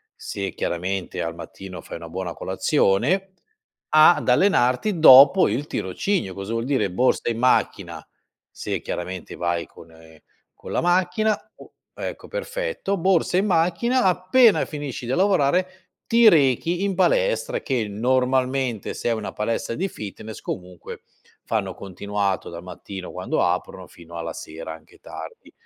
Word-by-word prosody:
se 100 -1 -5
chiaramente 90 +1 -3
al 85 -1 -4
mattino 95 +1 -9
fai - - -8
una 85 - -9
buona 90 0 -5
colazione 155 - +1 0.6
ad 155 -1 +5
allenarti 160 - +2
dopo 140 +4 +8
il 130 +8 -2
tirocinio. 95 - -2
Cosa 95 +4 -6
vuol 115 0 -1
dire: 130 -7 0
borsa 125 +5 +1
in 115 - -2
macchina, 125 +1 0 0.4
se - - -4
chiaramente 90 +1 -6
vai 85 -1 -2
con, 80 - -16
ehm 80 -1 -17 0.4
con - - -10
la - - 0
macchina 180 +5 +1 0.2
o - - -15 0.2
ecco, - - -7
perfetto: - - -3
borsa 180 0 +2
in 195 - +2
macchina, 185 +8 +1
appena 190 +6 +4
finisci 145 -5 -6
di 120 - -3
lavorare 185 0 +1 0.3
ti 230 -1 +6
rechi 165 - +2
in 200 -1 -1
palestra - - +1
che, 125 -6 -1
normalmente, 130 +1 0
se - - -3
è - - +2
una 110 -3 -3
palestra 115 +2 -2
di 190 +4 -1
fitness 110 - -8
comunque, 90 -2 -7 0.4
fanno - - -2
continuato 100 0 -3
dal 85 0 -9
mattino 90 +1 -8
quando - - -1
aprono, - - -2
fino 85 0 -14
alla 85 0 -4
sera 80 0 -8
anche 80 -1 -16
tardi. - - -10
125 Hz, 145 wpm, -23 LUFS, -, 0.6 s, dopo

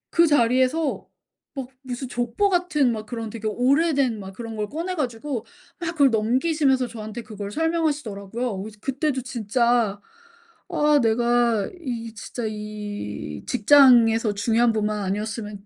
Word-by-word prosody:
그 335 0 +5
자리에서 260 +2 +2 0.4
막 265 -3 -6
무슨 260 0 -5
족보 245 - 0
같은 350 -8 +2
막 215 -2 -4
그런 225 -1 -5
되게 220 0 -5
오래된 265 +1 +2
막 190 -1 -8
그런 225 +2 -7
걸 210 -1 -3
꺼내 340 +5 -3
가지고 250 -3 -3 0.3
막 335 -2 -2
그걸 285 -5 +5
넘기시면서 260 +4 +2
저한테 220 0 -7
그걸 205 -3 -7
설명하시더라고요. 250 - -2
그래서 210 +1 -9
그때도 270 +1 -1
진짜 235 -2 0 0.7
'아 300 -4 +3
내가 235 -1 +2
이 230 -6 -5
진짜 235 +3 -6
이 205 - -6
직장에서 235 -3 +5
중요한 230 +3 +2
분만 215 -1 -1
아니었으면 210 +1 -4
240 Hz, 305 characters per minute, -24 LUFS, 215-275 Hz, 0.7 s, 그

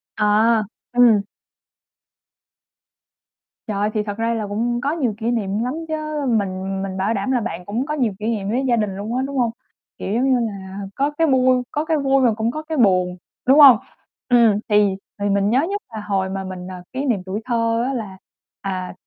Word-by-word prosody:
À, 215 +1 +3 0.3
ừm. 235 -4 +5 2.4
Trời! 205 0 0
Thì 210 -1 0
thật 205 0 -5
ra 230 +1 0
là 220 -2 -3
cũng 240 +4 -1
có 280 - 0
nhiều 275 -9 -1
kỷ 230 +1 -1
niệm 210 -2 -1
lắm 250 +3 -2
chớ, 305 -2 -3
mình 195 -4 -1
mình 190 -1 -4
bảo 195 +4 0
đảm 210 +5 -1
là 245 - +1
bạn 180 -5 -5
cũng 230 +6 -2
có 300 - -3
nhiều 250 -8 0
kỷ 210 - -5
niệm 210 -4 -1
với 255 +5 0
gia 240 - +3
đình 210 -4 -1
luôn 215 +5 -4
á, 255 - +1
đúng 275 -1 -5
hông? 235 -2 +2 0.5
Kiểu 195 - -4
giống 240 +4 +1
như 250 - +3
là 195 -4 -5 0.2
có 280 +2 +1
cái 325 - +3
bui 255 -2 +3
có 300 +2 -1
cái 320 -1 +1
vui 275 -1 +2
mà 235 - +4
cũng 220 +2 -1
có 310 +2 -5
cái 315 0 -4
buồn, 185 -6 +3 0.3
đúng 275 +4 +6
hông? 270 -6 +10 0.5
Ừm, 230 -4 +5
thì 205 -2 +3 0.2
thì 205 0 0
mình 200 0 +2
nhớ 250 +4 +3
nhất 405 +1 -2
là 215 - -5
hồi 195 -2 -1
mà 190 0 -4
mình, 185 -1 -7
ờ, 185 -1 -8
kỷ 265 +2 -2
niệm 230 -8 +1
tuổi 195 +3 -4
thơ 230 -1 +1
á 275 - -1
là, 210 -7 -5 0.4
à, 185 -2 -4
225 Hz, 210 wpm, -21 LUFS, 200-255 Hz, 2.4 s, hông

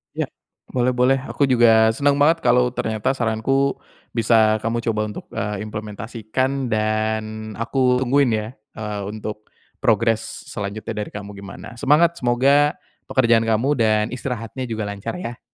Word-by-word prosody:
Ya, - - -1 0.4
boleh 125 0 +1
boleh. 125 +2 +3
Aku 140 - +2
juga 115 -3 +5
senang 140 +2 +2
banget 160 +3 +3
kalau 125 0 +4
ternyata 110 +4 -1
saranku 130 +4 0 0.3
bisa 110 -1 +3
kamu 115 +1 -2
coba 105 -1 -1
untuk, 105 - -8
eee, 105 0 -3
implementasikan 110 +5 -3
dan 110 0 -1
aku 125 +2 +1
tungguin 135 +1 +3
ya, 105 0 -3 0.3
eee, 105 -2 -4
untuk 105 0 -6 0.3
progress 115 -2 +1
selanjutnya 100 +2 -5
dari - - -10
kamu 105 0 -6
gimana. 100 +3 -10
Semangat! 165 +5 +3
Semoga 140 +5 +3 0.3
pekerjaan 115 -3 +3
kamu 115 +5 +2
dan 110 -1 +3
istirahatnya 125 0 -4
juga 110 -2 -3
lancar 100 - -5
ya. 120 -9 -6
115 Hz, 140 wpm, -21 LUFS, 110-130 Hz, 0.4 s, juga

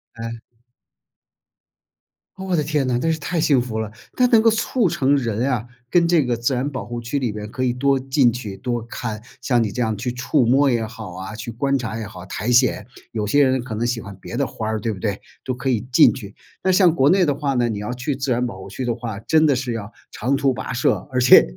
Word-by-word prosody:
哎。 115 0 -6 2.0
哦 190 - -7
我 185 -2 0
的 150 - +1
天 150 -2 0
哪， 120 -1 +1
真 165 +4 +1
是 160 - -1
太 170 +3 -2
幸 140 -4 +4
福 115 -3 -4
了。 110 -1 -3 0.2
它 250 - +4
能 230 -2 +5
够 225 - +6
促 225 0 +1
成 145 -4 +2
人 120 +1 -1
啊 120 -3 -1 0.2
跟 170 +2 +4
这 170 -4 +4
个 120 -2 -1
自 120 +3 0
然 130 +3 -1
保 130 -8 -5
护 120 +1 -5
区 120 +5 -2
里 125 -5 -1
边 105 0 -6
可 130 - -3
以 125 -1 +1
多 135 +1 +2
进 130 -2 +3
去 110 -5 -6
多 120 0 -2
看， 115 -1 -5 0.2
像 125 -2 +2
你 105 - -2
这 125 - -3
样 110 -2 0
去 125 +3 -2
触 125 +2 +1
摸 135 +4 +4
也 115 -3 +1
好 110 -5 -8
啊， 95 +2 -7
去 110 +2 -6
观 140 +5 0
察 115 -3 -4
也 110 - -4
好 95 -3 -10
苔 105 +5 -2
藓。 125 +1 +3 0.3
有 110 -2 -2
些 145 +7 +4
人 130 -2 +2
可 120 -3 -6
能 115 +3 -1
喜 120 -1 -1
欢 100 -1 -9
别 120 - -6
的 140 - +1
花 110 -3 -5
儿， 110 0 -1
对 110 +1 -2
不 95 - -9
对？ 100 -2 -2 0.2
都 130 - -2
可 125 +2 -5
以 115 -5 +1
进 125 - +6
去。 105 -4 -9 0.3
那 190 - +3
像 180 -3 +5
国 140 -3 +3
内 185 +1 +4
的 145 - +2
话 140 -1 -2
呢， 120 -1 +2
你 105 -2 -3
要 105 +4 -4
去 125 +3 -2
自 135 0 -2
然 120 +1 +1
保 95 -6 -6
护 95 - -9
区 125 +6 -4
的 120 - +1
话， 115 -3 -5
真 155 +7 +3
的 140 - +3
是 125 -2 -2
要 110 -1 -6 0.2
长 130 +5 0
途 135 -1 +2
跋 110 +1 -5
涉， 120 - +2 0.2
而 125 - 0
且 125 +1 +8
125 Hz, 275 characters per minute, -21 LUFS, 110-140 Hz, 2.0 s, 且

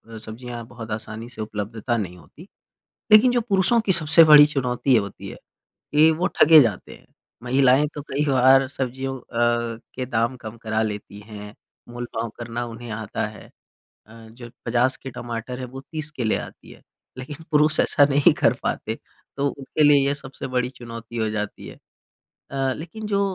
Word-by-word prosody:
अ, - - -7
सब्जियाँ 115 +2 -8
बहुत 115 -2 -10
आसानी 110 +2 -6
से 120 -3 -8
उपलब्धता 110 +2 -3
नहीं 90 -5 -5
होती 155 - -16 0.6
लेकिन 215 +4 +7
जो 245 -1 +1
पुरुषों 220 +1 +2
की 210 - 0
सबसे 160 0 +7
बड़ी 150 -2 +9
चुनौती 130 -2 0
होती 100 -3 -2
है - - -9 0.6
कि 155 +2 +6
वो 165 +3 0
ठगे 160 0 +6
जाते 110 -7 -3
हैं। - - -19 0.4
महिलाएँ 130 +3 +3
तो 145 - -6
कई 140 +1 -2
बार 135 0 +5
सब्जियों 135 0 -4
अ, - - -22 0.7
के 130 0 -4
दाम 120 +1 -1
कम 115 -2 -9
करा 110 0 -1
लेती 105 -1 -5
हैं 105 -1 -10 0.3
मोलभाव 120 -1 -5
करना 120 0 -4
उन्हें 120 0 -9
आता 110 -1 -4
है 105 0 -11 0.6
अ, 110 - -16 0.2
जो 120 +1 -12 0.2
50 120 +3 +1
के 135 - -8
टमाटर 120 +1 -6
है 130 - -4
वो 130 +2 -9
30 155 -2 -4
के 125 - -3
ले 110 - +1
आती - - -10
है - - -16 0.4
लेकिन 145 +5 -8
पुरुष 150 +1 +3
ऐसा 145 - +4
नहीं 140 0 +4
कर - - +2
पाते - - -2 0.4
तो 140 0 +1
उनके 140 +2 -2
लिए 145 -2 +5
ये 140 - +1
सबसे 135 -2 -9
बड़ी 125 -1 -1
चुनौती 115 -2 -9
हो 110 -1 0
जाती 105 -1 -5
है। - - -10 0.8
अ, 135 -1 -1
लेकिन 175 +8 -8
जो 200 -1 0
125 Hz, 180 wpm, -23 LUFS, 115-145 Hz, 0.8 s, बड़ी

